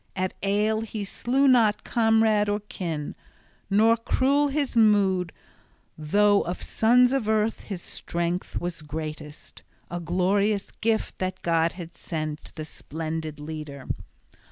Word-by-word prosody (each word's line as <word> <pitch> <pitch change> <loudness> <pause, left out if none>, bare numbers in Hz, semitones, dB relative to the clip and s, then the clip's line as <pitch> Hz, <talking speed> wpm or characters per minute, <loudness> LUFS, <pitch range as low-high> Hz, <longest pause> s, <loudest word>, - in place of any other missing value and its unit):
At 185 0 -1
ale 210 +2 +1
he 220 -2 -5
slew 260 +7 +1
not 230 -5 +4
comrade 220 -2 +3
or 205 +1 0
kin; 165 -7 -5 0.6
nor 220 +3 +5
cruel 270 +5 +2
his 280 -2 -1
mood, 195 -6 +3 0.6
though 205 +6 +3
of 175 - -4
sons 245 +3 +3
of 245 -6 0
earth 220 0 0
his 190 -4 -6
strength 170 +1 -3
was 175 -2 -4
greatest, 150 0 -7 0.3
a 175 - -3
glorious 195 +4 +1
gift 225 -1 -1
that 185 0 -3
God 165 -1 +2
had 175 -2 -9
sent 155 -2 -5
the 155 -2 -5
splendid 155 0 -5
leader. 150 -3 -7
195 Hz, 130 wpm, -26 LUFS, 165-220 Hz, 0.6 s, nor